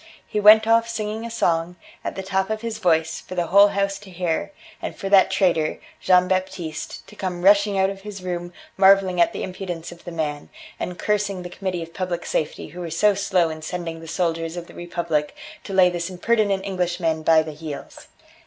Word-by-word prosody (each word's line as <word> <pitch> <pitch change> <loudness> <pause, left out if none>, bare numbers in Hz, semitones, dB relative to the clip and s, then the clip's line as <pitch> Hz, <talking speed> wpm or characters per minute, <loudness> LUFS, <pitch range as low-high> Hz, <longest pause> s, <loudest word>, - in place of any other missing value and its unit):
He 210 - -2
went 215 +1 +8
off 230 +1 +3
singing 220 0 -3
a - - -5
song, 175 -6 0 0.3
at - - -4
the 190 - -5
top 190 0 -1
of 220 0 -2
his 230 -2 -4
voice, 160 -4 +1
for 185 - -9
the 175 -1 0
whole 200 +4 +7
house 200 -1 -1
to 205 -1 -14
hear, 175 - -2 0.3
and - - -5
for 195 - -5
that 195 -1 +6
traitor, 165 -5 +1 0.2
Jean 180 0 +4
Baptiste, 185 -4 -3
to 210 - -15
come 180 -3 -4
rushing 200 +1 +5
out 190 0 +2
of 195 0 -9
his 200 -2 -8
room 175 -1 -4 0.3
marvelling 190 -2 +5
at 170 - +4
the - - -5
impudence 180 -3 -6
of 175 - -13
the 175 - -7
man, 150 -3 -3 0.3
and 180 0 -4
cursing 200 -3 -1
the 175 - -8
Committee 180 -2 -3
of 165 0 -12
Public 180 -2 -3
Safety 155 - -2
who 180 - -10
were 175 -2 -4
so 205 +6 +3
slow 190 -4 +1
in 155 0 -7
sending 165 0 -5
the 165 - -11
soldiers 165 0 -2
of 175 - -5
the - - -15
Republic 170 -3 -2 0.3
to - - -7
lay 190 -1 +6
this 175 0 -2
impertinent 200 +1 +1
Englishman 175 -4 -1
by 160 0 +5
the 155 -1 -7
heels. 150 -1 -8
180 Hz, 210 wpm, -23 LUFS, 170-195 Hz, 0.3 s, went